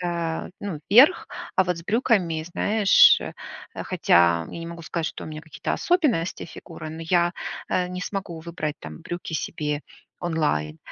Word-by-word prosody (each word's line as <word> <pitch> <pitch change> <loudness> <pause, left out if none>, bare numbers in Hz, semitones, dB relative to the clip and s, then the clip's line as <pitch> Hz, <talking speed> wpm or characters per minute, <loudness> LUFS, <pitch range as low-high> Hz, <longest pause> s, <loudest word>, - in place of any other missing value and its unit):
э, 170 -2 -2
ну, 185 -7 -5
верх, 275 - +7 0.3
а 190 - +5
вот 180 -1 -1
с - - -8
брюками, 195 -8 +1
знаешь, 210 -2 +6 0.6
хотя 85 -1 +3
я - - -7
не 165 - -6
могу 170 0 -8
сказать, 165 0 -3
что - - -6
у - - -8
меня 155 0 -7
какие-то 160 -2 -5
особенности 295 - +1
фигуры, 155 - -9
но 160 - -8
я, 175 +1 +2 0.4
э, 180 -1 0
не 180 0 -5
смогу 195 -3 -4
выбрать 160 -2 -4
там 80 -1 -9
брюки 175 -1 -6
себе 150 -1 -2 0.4
онлайн. 150 - -1
170 Hz, 160 wpm, -24 LUFS, 155-185 Hz, 0.6 s, верх